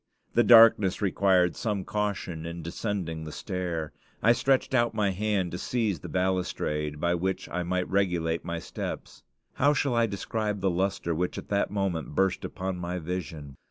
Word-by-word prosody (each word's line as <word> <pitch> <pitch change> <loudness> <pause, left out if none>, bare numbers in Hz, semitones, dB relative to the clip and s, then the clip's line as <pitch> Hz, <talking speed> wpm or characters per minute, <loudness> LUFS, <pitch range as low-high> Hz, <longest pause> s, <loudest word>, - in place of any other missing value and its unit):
The 120 - +5
darkness 110 -4 +7
required 95 -3 +3
some 105 -5 -2
caution 100 -6 -2
in 85 0 -6
descending 85 -2 -3
the 75 - -7
stair. 85 -4 -4 0.3
I 115 - +6
stretched 130 +2 +2
out 120 -3 +2
my 105 -3 +2
hand 95 -2 -1
to 90 - -5
seize 110 -8 -1
the - - -8
balustrade, 90 -5 -1
by 85 +2 +1
which 95 +2 -2
I 90 - -2
might 90 +1 -1
regulate 85 -4 0
my 85 0 -3
steps. - - -6 0.3
How 145 +2 +3
shall 140 -2 +1
I 115 -1 +3
describe 105 +1 -2
the 95 -1 +1
lustre 90 -1 -1
which 90 +3 -2
at - - -8
that 100 0 +1
moment 95 -7 -2
burst 95 0 +1
upon 95 0 -4
my 90 +1 -3
vision? 80 -5 -5
95 Hz, 170 wpm, -27 LUFS, 85-105 Hz, 0.3 s, darkness